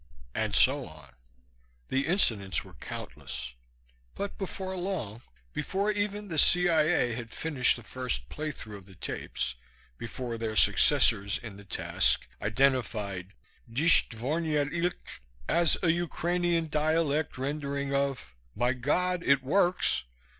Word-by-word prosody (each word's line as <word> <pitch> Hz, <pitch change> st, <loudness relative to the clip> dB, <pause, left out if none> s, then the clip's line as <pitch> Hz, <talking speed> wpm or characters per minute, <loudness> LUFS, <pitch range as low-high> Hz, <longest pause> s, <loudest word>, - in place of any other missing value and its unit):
And 110 Hz, -2 st, -1 dB
so 135 Hz, 0 st, +4 dB
on. 75 Hz, -4 st, -15 dB, 0.8 s
The 135 Hz, +1 st, 0 dB
incidents 115 Hz, -, +1 dB
were -, -, -14 dB
countless. -, -, -7 dB, 0.6 s
But 200 Hz, -, -4 dB
before 190 Hz, -1 st, -4 dB
long, 175 Hz, -, -3 dB, 0.3 s
before 195 Hz, +7 st, 0 dB
even 205 Hz, 0 st, -2 dB
the 160 Hz, -5 st, 0 dB
C.I.A. 165 Hz, -7 st, +4 dB
had 115 Hz, -1 st, -6 dB
finished 135 Hz, 0 st, +1 dB
the 120 Hz, -, -10 dB
first 125 Hz, -, -3 dB
playthrough 140 Hz, -, -6 dB
of 95 Hz, -1 st, -15 dB
the 95 Hz, -, -15 dB
tapes, 65 Hz, -7 st, -3 dB, 0.5 s
before 115 Hz, 0 st, -5 dB
their 110 Hz, -1 st, -2 dB
successors 105 Hz, -1 st, +4 dB
in 110 Hz, -4 st, -9 dB
the 100 Hz, -, -13 dB
task 95 Hz, -, +1 dB, 0.2 s
identified 105 Hz, -6 st, 0 dB, 0.4 s
Disht 155 Hz, +8 st, +4 dB
dvornyet 145 Hz, +5 st, -1 dB
ilgt 175 Hz, +1 st, 0 dB, 0.5 s
as 170 Hz, -2 st, +4 dB
a 165 Hz, -, +5 dB
Ukrainian 175 Hz, 0 st, 0 dB
dialect 155 Hz, -1 st, +1 dB
rendering 140 Hz, 0 st, -2 dB
of, 140 Hz, -, -1 dB, 0.2 s
My 120 Hz, +3 st, +2 dB
God, 175 Hz, +8 st, 0 dB
it 140 Hz, -1 st, +4 dB
works! 180 Hz, -, +2 dB
140 Hz, 125 wpm, -29 LUFS, 110-170 Hz, 0.8 s, a